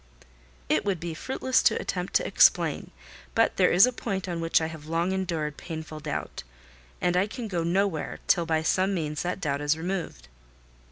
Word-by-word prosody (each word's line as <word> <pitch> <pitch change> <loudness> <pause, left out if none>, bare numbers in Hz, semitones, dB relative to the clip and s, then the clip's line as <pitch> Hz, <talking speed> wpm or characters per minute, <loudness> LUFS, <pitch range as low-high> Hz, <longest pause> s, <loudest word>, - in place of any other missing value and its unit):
"It - - +2
would 200 -4 -1
be 170 0 -4
fruitless 260 +8 0
to - - +3
attempt 180 -1 -4
to - - +3
explain; - - +3 0.5
but 225 - +2
there 185 - +5
is 180 +5 +7
a 255 - -1
point 195 -5 -3
on 170 -2 -3
which 165 0 +3
I 160 - -1
have 160 -2 -8
long 165 +3 0
endured 165 -6 -2
painful 160 -2 -7
doubt, 150 0 -5 0.6
and 175 0 +1
I 185 +3 +2
can 230 +1 -6
go 175 -5 -2
nowhere 175 -1 0
till 170 -2 +2
by 160 -1 +1
some 190 +4 +1
means 150 -3 -2
that 180 +1 -2
doubt 140 -4 -2
is 145 +1 +1
removed." 165 - -4
170 Hz, 185 wpm, -27 LUFS, 160-190 Hz, 0.6 s, is